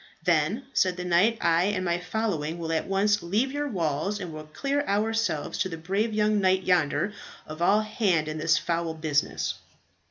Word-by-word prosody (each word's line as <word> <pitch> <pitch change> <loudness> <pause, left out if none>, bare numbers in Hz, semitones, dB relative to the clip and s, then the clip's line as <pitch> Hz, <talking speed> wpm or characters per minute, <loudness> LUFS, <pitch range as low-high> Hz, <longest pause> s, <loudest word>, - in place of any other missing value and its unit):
"Then," 175 - +1
said 185 -1 +2
the 180 - -4
knight, 180 +6 +3
"I 170 +1 +3
and 195 -2 -1
my 175 0 0
following 175 -4 -2
will 165 -1 -4
at 160 - -1
once 205 +2 +2
leave 215 +10 0
your 290 +1 -2
walls, 180 - -1
and 180 -5 -6
will 155 0 -8
clear 280 - -1
ourselves 215 -5 0
to 190 - 0
the 165 - -6
brave 195 +7 -1
young 210 0 +2
knight 190 0 +2
yonder 180 +3 +1 0.3
of 155 +2 -9
all 205 +5 +4
hand 200 -7 0
in 155 0 -4
this 155 0 +3
foul 170 -1 -2
business." 155 -2 -1
180 Hz, 185 wpm, -26 LUFS, 165-210 Hz, 0.3 s, all